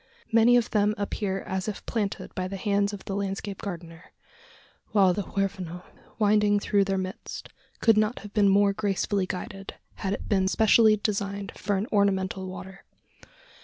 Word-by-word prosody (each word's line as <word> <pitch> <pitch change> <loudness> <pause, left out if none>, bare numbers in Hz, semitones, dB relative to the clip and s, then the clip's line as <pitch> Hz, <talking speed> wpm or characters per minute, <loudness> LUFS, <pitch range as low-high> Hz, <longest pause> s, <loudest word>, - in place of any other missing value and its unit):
Many 230 +2 +6
of 235 - 0
them 210 -1 +2
appear 200 -1 -2
as 190 +1 -3
if 210 - -5
planted 210 -4 -3
by 185 0 -3
the 195 +1 -5
hands 200 0 +1
of 205 -2 -8
the 195 - -3
landscape 200 0 -4
gardener; 170 -4 -7 0.9
while 195 -4 +5
the 205 - -2
Huerfano, 185 -3 -3 0.3
winding 210 -1 +3
through 200 -1 +2
their 195 0 0
midst, 185 0 -6 0.3
could 225 -2 +5
not 215 +3 +1
have 205 0 -11
been 205 -2 +4
more 200 0 +4
gracefully 200 -1 -1
guided, 195 +1 -6 0.2
had 195 0 -2
it - - -5
been 190 -2 +2
specially 220 +1 +5
designed 200 -1 -2
for 200 +1 -1
an 195 - -1
"ornamental 190 -2 +1
water." 190 +1 -9
200 Hz, 165 wpm, -27 LUFS, 190-210 Hz, 0.9 s, Many